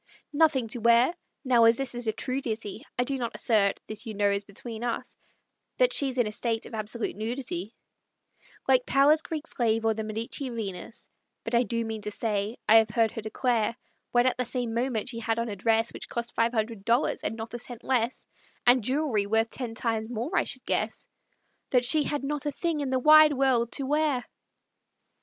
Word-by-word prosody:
Nothing 290 Hz, -5 st, +3 dB
to 240 Hz, -, +1 dB
wear! 235 Hz, +6 st, +4 dB, 0.3 s
Now, 240 Hz, -3 st, +5 dB
as 230 Hz, 0 st, +5 dB
this 270 Hz, -2 st, -3 dB
is 240 Hz, -1 st, -5 dB
a -, -, +3 dB
true 255 Hz, +4 st, -3 dB
ditty, 220 Hz, -4 st, -5 dB
I 245 Hz, -, +3 dB
do 270 Hz, +1 st, -3 dB
not 235 Hz, -1 st, -3 dB
assert 205 Hz, -4 st, +2 dB
this, 215 Hz, +2 st, -6 dB
you 215 Hz, -, -5 dB
know, 205 Hz, 0 st, +2 dB
is 200 Hz, 0 st, -1 dB
between 220 Hz, +3 st, -8 dB
us 240 Hz, -1 st, -3 dB, 0.6 s
That -, -, +3 dB
she's 270 Hz, -2 st, +1 dB
in 245 Hz, -, +3 dB
a 210 Hz, -, -3 dB
state 225 Hz, +1 st, -2 dB
of -, -, -11 dB
absolute 220 Hz, +1 st, -3 dB
nudity, 220 Hz, -3 st, -4 dB, 0.9 s
Like 255 Hz, -2 st, +3 dB
Powers's 285 Hz, +4 st, +5 dB
Greek 320 Hz, -1 st, -5 dB
Slave 225 Hz, -5 st, 0 dB
or 225 Hz, -, +3 dB
the 220 Hz, 0 st, -4 dB
Medici 225 Hz, +5 st, -4 dB
Venus; 220 Hz, -1 st, -7 dB, 0.3 s
But 225 Hz, -, -5 dB
I 235 Hz, -, +5 dB
do 230 Hz, -2 st, -2 dB
mean 220 Hz, -1 st, -5 dB
to 210 Hz, -, -4 dB
say, 210 Hz, +1 st, -2 dB
I 220 Hz, -, +8 dB
have 220 Hz, -1 st, +4 dB
heard 225 Hz, 0 st, +2 dB
her 225 Hz, -, -6 dB
declare, 230 Hz, +1 st, 0 dB, 0.3 s
When 240 Hz, 0 st, +3 dB
at 255 Hz, -, +1 dB
the -, -, +2 dB
same 245 Hz, -1 st, -3 dB
moment 235 Hz, -1 st, -1 dB
she 230 Hz, -2 st, -6 dB
had 225 Hz, 0 st, -1 dB
on 230 Hz, 0 st, -2 dB
a 205 Hz, -, -4 dB
dress 225 Hz, +3 st, +1 dB
Which -, -, -7 dB
cost 235 Hz, 0 st, -4 dB
five 230 Hz, +1 st, +2 dB
hundred 220 Hz, -3 st, -2 dB
dollars, 235 Hz, +6 st, +1 dB
and -, -, -2 dB
not 225 Hz, +1 st, -7 dB
a 240 Hz, -, -4 dB
cent 240 Hz, -1 st, -8 dB
less, 245 Hz, -2 st, -1 dB, 0.4 s
And 245 Hz, -1 st, +5 dB
jewelry 255 Hz, -5 st, 0 dB
worth 225 Hz, +2 st, +1 dB
ten 240 Hz, -3 st, -5 dB
times 225 Hz, -1 st, -2 dB
more, 245 Hz, -, -3 dB
I -, -, +3 dB
should -, -, -5 dB
guess, -, -, -2 dB, 0.6 s
That 250 Hz, -1 st, +3 dB
she 295 Hz, +3 st, +5 dB
had 290 Hz, -2 st, -2 dB
not 295 Hz, +1 st, -3 dB
a -, -, 0 dB
thing 330 Hz, +1 st, -2 dB
in 280 Hz, -2 st, -2 dB
the 260 Hz, -, +1 dB
wide 305 Hz, +3 st, +7 dB
world 255 Hz, -4 st, +2 dB
to 275 Hz, -, -1 dB
wear! 295 Hz, -3 st, +1 dB
235 Hz, 210 wpm, -27 LUFS, 220-260 Hz, 0.9 s, I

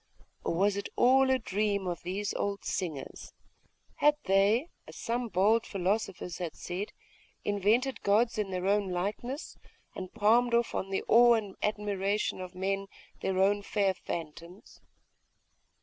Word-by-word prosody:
Or -, -, -1 dB
was 200 Hz, +3 st, +2 dB
it 200 Hz, -, -4 dB
all 265 Hz, +2 st, +5 dB
a 260 Hz, -, +4 dB
dream 205 Hz, -3 st, -1 dB
of 175 Hz, -2 st, -3 dB
these 195 Hz, +4 st, -3 dB
old 200 Hz, 0 st, -3 dB
singers? 155 Hz, -8 st, -4 dB, 0.6 s
Had 295 Hz, 0 st, +4 dB
they, 205 Hz, -, +3 dB, 0.2 s
as -, -, -11 dB
some 240 Hz, +1 st, -2 dB
bold 215 Hz, +3 st, +3 dB
philosophers 195 Hz, -2 st, -2 dB
had 175 Hz, -3 st, -4 dB
said, 185 Hz, +4 st, -5 dB, 0.5 s
invented 215 Hz, +6 st, +1 dB
gods 220 Hz, +3 st, +2 dB
in 205 Hz, -2 st, -1 dB
their 185 Hz, -1 st, -3 dB
own 200 Hz, 0 st, +2 dB
likeness, 205 Hz, +10 st, -4 dB, 0.4 s
and 185 Hz, -1 st, -6 dB
palmed 235 Hz, +2 st, +3 dB
off 235 Hz, 0 st, +1 dB
on 195 Hz, -, -2 dB
the 195 Hz, -, -1 dB
awe 240 Hz, +1 st, +7 dB
and 205 Hz, -4 st, -3 dB
admiration 205 Hz, -2 st, -1 dB
of 185 Hz, 0 st, -8 dB
men 195 Hz, +1 st, -2 dB, 0.3 s
their 190 Hz, -1 st, -1 dB
own 200 Hz, +2 st, +3 dB
fair 200 Hz, -1 st, +1 dB
phantoms?.... 170 Hz, +1 st, -8 dB
200 Hz, 145 wpm, -30 LUFS, 190-220 Hz, 0.6 s, awe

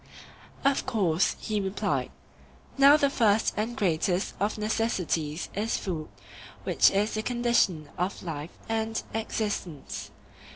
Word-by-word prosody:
Of 275 Hz, -1 st, +2 dB
course, 190 Hz, -8 st, +2 dB
he 215 Hz, -2 st, -1 dB
replied. 195 Hz, +1 st, -1 dB, 0.7 s
Now 280 Hz, +2 st, +8 dB
the 285 Hz, -, +3 dB
first 220 Hz, -6 st, +2 dB
and 225 Hz, +3 st, -2 dB
greatest 180 Hz, 0 st, +1 dB
of 205 Hz, +2 st, 0 dB
necessities 190 Hz, -8 st, -1 dB
is 215 Hz, +3 st, 0 dB
food, 165 Hz, -5 st, -4 dB, 0.6 s
which -, -, +5 dB
is 205 Hz, +3 st, 0 dB
the 215 Hz, -, -1 dB
condition 235 Hz, -10 st, +1 dB
of 180 Hz, +3 st, -2 dB
life 160 Hz, -2 st, -6 dB
and 225 Hz, 0 st, -1 dB
existence. 205 Hz, -9 st, -3 dB
210 Hz, 120 wpm, -28 LUFS, 175-225 Hz, 0.7 s, Now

